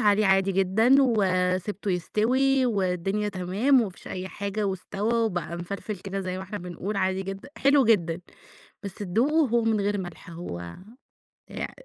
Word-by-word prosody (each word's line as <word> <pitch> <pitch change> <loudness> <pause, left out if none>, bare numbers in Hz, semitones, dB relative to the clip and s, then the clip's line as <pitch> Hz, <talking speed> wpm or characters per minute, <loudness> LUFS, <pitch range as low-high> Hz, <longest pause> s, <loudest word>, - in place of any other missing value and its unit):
عليه 210 -1 +4
عادي 195 0 +3
جدًا، 195 +7 +3
وسبته 195 -4 +1
يستوي 255 +9 +2
والدنيا 195 -1 0
تمام، 200 +8 +2
وما 215 -5 -1
فيش - - -13
أي 185 0 -5
حاجة 200 +2 -3
واستوى 195 +4 -2
وبقى 180 -7 -1
مفلفل 200 +4 -5
كده 195 +1 -4
زي 185 -1 -3
ما - - -5
إحنا 205 +2 -6
بنقول 180 +3 -5
عادي 190 0 0
جدًا، 195 0 -7
حلو 275 0 +5
جدًا 175 -7 +2 0.6
بس 200 -2 -5
تدوقة 255 - +1
هو 235 0 +2
من 220 -2 +2
غير 205 +1 0
ملح 175 -1 -9
هو 170 - -6 0.9
يع - - -4
أ - - -14
أ - - -16
195 Hz, 165 wpm, -26 LUFS, 185-220 Hz, 0.9 s, حلو